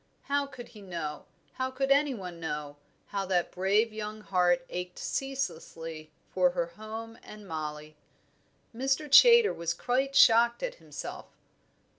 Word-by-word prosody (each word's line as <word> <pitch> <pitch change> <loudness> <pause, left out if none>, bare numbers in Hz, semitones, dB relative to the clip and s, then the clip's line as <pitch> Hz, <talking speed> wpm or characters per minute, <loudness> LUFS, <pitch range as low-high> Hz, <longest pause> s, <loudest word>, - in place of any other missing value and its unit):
How 280 0 0
could 245 -3 -11
he 215 -3 -14
know, 165 -6 -5 0.3
how 260 0 -2
could 270 +1 -1
any 280 -1 +3
one 180 -5 -8
know, 150 -3 -5 0.3
how 200 -1 -2
that 180 -2 0
brave 205 +5 +1
young 215 0 -6
heart 180 -3 +2
ached 180 0 -6
ceaselessly 165 - -4 0.2
for 180 -1 +4
her 170 - +2
home 220 +6 -9
and 210 -1 -12
Mollie. 155 -2 -6 0.8
Mr. 270 +5 0
Chaytor 470 - +8
was 170 0 -3
quite 265 +2 -1
shocked 235 - +6
at - - -2
himself. - - -8
210 Hz, 140 wpm, -29 LUFS, 170-260 Hz, 0.8 s, Chaytor